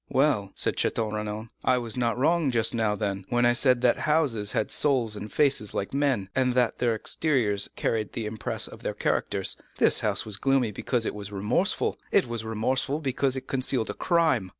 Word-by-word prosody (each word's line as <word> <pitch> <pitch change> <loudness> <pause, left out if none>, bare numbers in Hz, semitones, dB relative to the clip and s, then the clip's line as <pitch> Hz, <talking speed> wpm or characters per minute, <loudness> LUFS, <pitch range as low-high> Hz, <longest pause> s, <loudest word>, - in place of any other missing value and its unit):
"Well," 130 -8 +1
said - - 0
Château 110 -2 -1
Renaud, 105 +1 -4
"I 130 - +3
was 115 -3 -4
not 120 -2 0
wrong 160 +2 +2
just 115 -3 +2
now 110 -3 0
then, 100 -2 -3
when 120 0 +2
I 120 - +4
said 125 0 +3
that 125 -1 +3
houses 135 -10 0
had 110 - -1
souls 125 -7 +2
and 105 +1 -7
faces 140 -8 +2
like 100 - -3
men, 135 -8 0
and 130 -1 +1
that 125 -2 +1
their 120 -2 +1
exteriors 110 -5 0
carried 110 -2 -2
the 115 - -4
impress 110 +1 -1
of - - -12
their - - -3
characters. - - 0 0.2
This - - +4
house - - -1
was 105 -2 -3
gloomy 135 -4 +1
because 115 +3 -2
it - - -2
was 105 -1 -7
remorseful: 110 - 0
it 200 - +4
was 120 -2 -4
remorseful 130 +6 -1
because 135 -2 0
it 130 - -5
concealed 130 -3 -1
a - - -7
crime." 160 - +1
120 Hz, 195 wpm, -26 LUFS, 105-135 Hz, 0.2 s, I